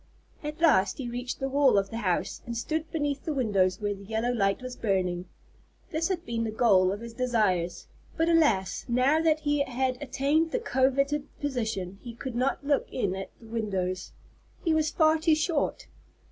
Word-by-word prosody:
At 300 +1 -5
last 300 - +4
he 265 - -4
reached 245 +1 -4
the 270 - -1
wall 270 -4 +4
of 195 0 0
the 225 - -3
house, 185 -6 -1
and 235 -1 -3
stood 315 +6 -2
beneath 290 -4 -2
the 310 - -2
windows 195 -8 +2
where 205 -1 -1
the 200 0 -11
yellow 220 +4 -1
light 195 -4 +1
was 255 0 -7
burning. 180 -4 -1 0.7
This 330 +1 0
had 350 -3 -2
been 230 -4 -2
the 225 - -1
goal 200 -5 +4
of 205 +2 -4
his 235 0 -8
desires; 210 -9 0 0.3
but, 325 +1 +2
alas, 295 - +2
now 260 +6 +3
that 315 -1 +2
he 290 -1 +1
had 260 -1 -1
attained 290 +4 +1
the 485 - -1
coveted 275 - +1
position 220 -9 -3
he 235 -2 -8
could 260 +1 -6
not 260 +4 -1
look 285 -1 +1
in 195 -7 -1
at 190 0 -5
the 230 - -15
windows 195 -5 -2 0.5
he 330 -4 +2
was 310 -1 +2
far 315 0 +3
too 320 0 +4
short. 310 -1 -1
250 Hz, 190 wpm, -28 LUFS, 205-295 Hz, 0.7 s, last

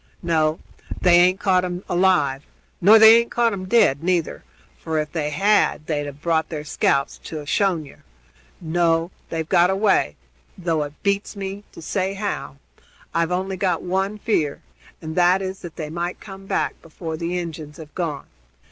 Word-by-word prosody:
No, 160 -2 +1 0.4
they 175 -1 +5
aint 185 +2 +4
caught 185 -2 +2
'em 180 +1 -4
alive, 165 -7 +2 0.4
nor 210 +5 +8
they 220 +1 +9
aint 235 - -7
caught 235 -2 +1
'em 185 -1 -5
dead 165 - +3
neither; 175 - -1 0.3
for, 160 -1 -4
ef 150 -1 -2
they 155 -3 -2
had 195 -1 +2
they'd 145 -2 -2
have 145 0 -10
brought 165 -2 +1
their 150 -3 -5
scalps 140 -2 0
to 160 - -7
have 150 -1 -8
shown 185 -6 +1
yer. 140 - -16 0.6
No, 165 0 +1 0.2
they've 160 -1 -3
got 175 0 +4
away, 190 - +2 0.4
though 165 -4 -1
it 145 +1 -13
beats 200 +1 -1
me 200 +1 -6
to - - -12
say 190 +3 -1
how. 155 -10 -4 0.6
I've 165 0 0
only 190 +1 -2
got 180 -3 0
one 190 +3 -1
fear, 160 -9 -1 0.4
and 160 0 -5
that 180 +1 +4
is 190 0 -5
that 170 -2 -9
they 155 -2 -6
might 175 +2 -3
come 195 -1 -11
back - - -1
before 165 0 -7
the 170 +2 -3
Injuns 160 -3 -6
have 155 -2 -11
gone. 155 -6 -3
175 Hz, 175 wpm, -22 LUFS, 155-190 Hz, 0.6 s, they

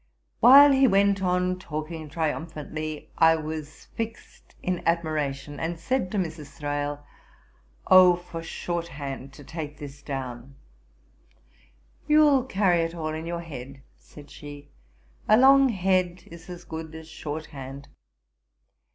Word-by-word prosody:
While 280 +5 +9
he 270 0 +5
went 200 -1 +3
on 180 0 0
talking 155 -1 -6
triumphantly, 155 0 -4
I 165 0 +6
was 155 -1 -6
fixed 225 0 -8
in 180 -1 -1
admiration, 150 -4 -1
and 165 +1 -3
said 255 +1 -1
to 210 - -3
Mrs. 155 -6 -4
Thrale, 145 0 -3 0.8
'O, 185 -1 +7
for 175 -1 -8
short 170 +1 -4
hand 140 -2 -7
to 145 - -13
take 150 0 -7
this 140 -1 -10
down!' 135 -1 -6 1.5
'You'll 300 -4 +5
carry 190 -7 +2
it 165 +1 -3
all 155 -2 -3
in 160 +1 -5
your 170 0 -3
head; 135 -4 -9 0.2
(said 145 -1 -15
she;) 145 -1 -11 0.6
a 215 - +7
long 270 +1 +6
head 185 -3 0
is 170 +1 -12
as 175 -1 -8
good 160 -2 -7
as 160 0 -10
short 155 -1 -6
hand.' 135 0 -8
160 Hz, 135 wpm, -26 LUFS, 145-185 Hz, 1.5 s, While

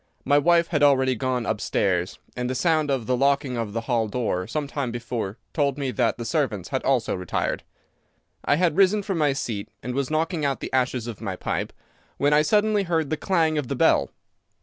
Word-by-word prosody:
My 145 0 +4
wife 170 +2 +3
had 150 -4 0
already 130 -2 +4
gone 125 0 -1
upstairs, 95 -4 0 0.2
and 125 0 -2
the 130 - -2
sound 155 +2 +2
of 135 -5 0
the 125 - +1
locking 140 0 +1
of 115 -3 -3
the 115 - -2
hall 115 -2 0
door 100 -5 -2
some 150 +5 -2
time 140 -2 -3
before 115 -3 -4 0.2
told 140 -3 +1
me 135 -3 -2
that 120 -3 +1
the 120 - -5
servants 115 - -1
had 130 - -1
also 130 -4 +1
retired. 90 -2 -2 0.8
I - - +3
had 170 -1 +2
risen 200 +1 +4
from 195 -4 -2
my 145 -3 +3
seat 115 -7 -4
and 125 +2 -4
was 135 0 -1
knocking 160 +1 -1
out 140 -2 0
the - - -6
ashes 125 -2 +1
of 115 -3 -7
my 100 -4 -3
pipe - - -3 0.5
when 145 +1 +2
I 150 - +6
suddenly 210 +6 +2
heard 165 -5 -1
the - - +2
clang 160 -2 +1
of 140 - -4
the - - -2
bell. - - +3
135 Hz, 210 wpm, -24 LUFS, 120-155 Hz, 0.8 s, I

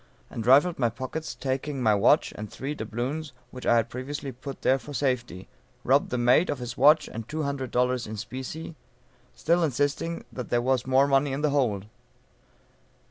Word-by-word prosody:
and 115 -1 -5
rifled 145 +6 +5
my 120 -3 +3
pockets, 130 +7 -6
taking 135 +1 -3
my 110 -4 +3
watch, 115 +9 +4
and 105 0 -7
three 140 +3 -4
doubloons 135 +5 -4 0.2
which 125 -1 -7
I 120 - +5
had 115 -1 +2
previously 135 +3 -5
put 130 +2 -9
there 135 +1 +3
for 145 +2 -9
safety; 120 -8 -2 0.4
robbed - - +3
the 125 - -1
mate 125 +8 +4
of 145 - -1
his 120 -1 -6
watch 150 +4 +5
and 115 +1 -8
two 155 0 -2
hundred 140 -2 -3
dollars 125 0 0
in 110 0 -6
specie, 130 +9 -6 0.6
still 170 +2 +2
insisting 145 +3 -1
that 125 - -6
there 120 - +2
was 130 0 0
more 130 +1 +4
money 135 0 +2
in 140 - -3
the 150 -1 +2
hold. 115 -9 0
130 Hz, 185 wpm, -26 LUFS, 120-145 Hz, 0.6 s, rifled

